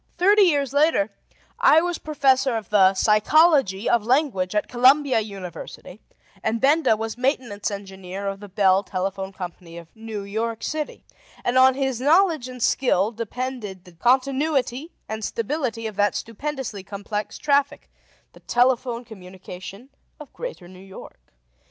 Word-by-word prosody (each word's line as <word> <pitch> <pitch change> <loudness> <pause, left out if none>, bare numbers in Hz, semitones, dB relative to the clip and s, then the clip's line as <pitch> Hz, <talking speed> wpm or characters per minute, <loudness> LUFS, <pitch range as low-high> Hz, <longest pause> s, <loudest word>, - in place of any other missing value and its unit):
Thirty 405 +4 +5
years 285 -8 +2
later, 285 -8 +2 0.5
I 315 - +6
was 350 0 -2
Professor 265 -4 +1
of 220 - -8
the 195 -2 +5
Psychology 220 - +3
of 235 -3 +2
Language 235 -7 0
at 210 - 0
Columbia 260 +1 +4
University, 195 -1 -8 0.4
and 225 +1 -1
Benda 275 -3 +3
was 225 +2 -5
Maintenance 250 -6 -1
Engineer 195 -1 -7
of 195 0 -4
the 205 0 -11
Bell 190 -1 +3
Telephone 190 0 -4
Company 175 -2 -9
of 170 -1 -13
New 220 -2 -6
York 225 +3 -3
City; 305 0 -4 0.4
and 245 - 0
on 260 0 +6
his 265 -3 -2
knowledge 315 -2 +3
and 250 -2 -6
skill 215 -5 +2
depended 230 -4 -5
the 180 - -14
continuity 265 - 0 0.2
and 220 0 -5
stability 230 0 -3
of 215 -3 -5
that 205 0 +2
stupendously 245 -2 -5
complex 205 +2 -5
traffic, 285 0 0 0.5
the - - -16
telephone 245 -1 0
communication 190 +2 -11 0.3
of 300 - -12
Greater 485 - -7
New 185 0 -14
York. 190 0 -12
230 Hz, 140 wpm, -23 LUFS, 200-270 Hz, 0.5 s, I